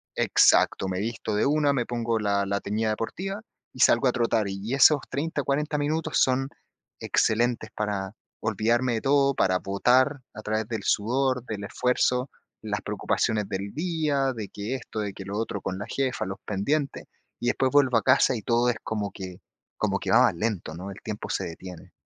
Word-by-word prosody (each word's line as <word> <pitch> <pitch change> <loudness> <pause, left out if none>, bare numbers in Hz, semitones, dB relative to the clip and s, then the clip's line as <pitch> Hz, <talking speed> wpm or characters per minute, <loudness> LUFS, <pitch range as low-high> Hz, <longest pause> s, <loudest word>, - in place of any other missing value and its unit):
Exacto. 95 - +4
Me 95 -1 -2
visto 110 0 -3
de 105 - +2
una, 145 0 +3
me 125 -4 0
pongo 115 -1 -1
la 100 -1 +1
la 100 +1 -1
teñida 110 +2 -1
deportiva 190 - -4 0.3
y - - -13
salgo 120 +1 +5
a - - +4
trotar. 115 -3 +1
Y 100 +5 -4
esos 145 +2 +6
30, 145 +2 -2
40 150 +2 0
minutos 155 +2 0
son 130 +1 +2 0.5
excelentes 115 0 +1
para 100 -2 -2 0.3
olvidarme 115 +3 +1
de 110 - -2
todo, 140 0 +3
para 95 -1 +2
botar, 130 +9 +2
a 110 - -7
través 110 +1 -1
del 110 -4 -3
sudor, 125 +5 +1
del 105 -4 -5
esfuerzo, 125 +3 +1 0.3
las - - -3
preocupaciones 105 -3 -1
del 100 +1 -4
día, 155 -5 0
de 110 -4 -5
que 105 +7 -4
esto, 120 -3 -6
de 105 -1 -3
que 95 - -9
lo 100 +1 -4
otro 110 -2 -2
con 95 - -4
la 100 - -4
jefa, 135 -2 -1
los 95 +1 -6
pendientes. 135 +9 -1 0.4
Y 120 - -1
después 130 +1 +1
vuelvo 135 -4 +5
a 115 - 0
casa 130 0 +4
y - - -6
todo 120 +2 +2
es 120 - 0
como 105 -2 -3
que 95 -2 -8 0.4
como 100 -2 0
que - - -3
va 120 - +6
más 115 -8 +3
lento, 95 -4 -2
¿no? 90 +4 -7
El 95 - -11
tiempo 105 -1 -5
se - - -1
detiene. 90 +1 -9
115 Hz, 190 wpm, -26 LUFS, 100-135 Hz, 0.5 s, esos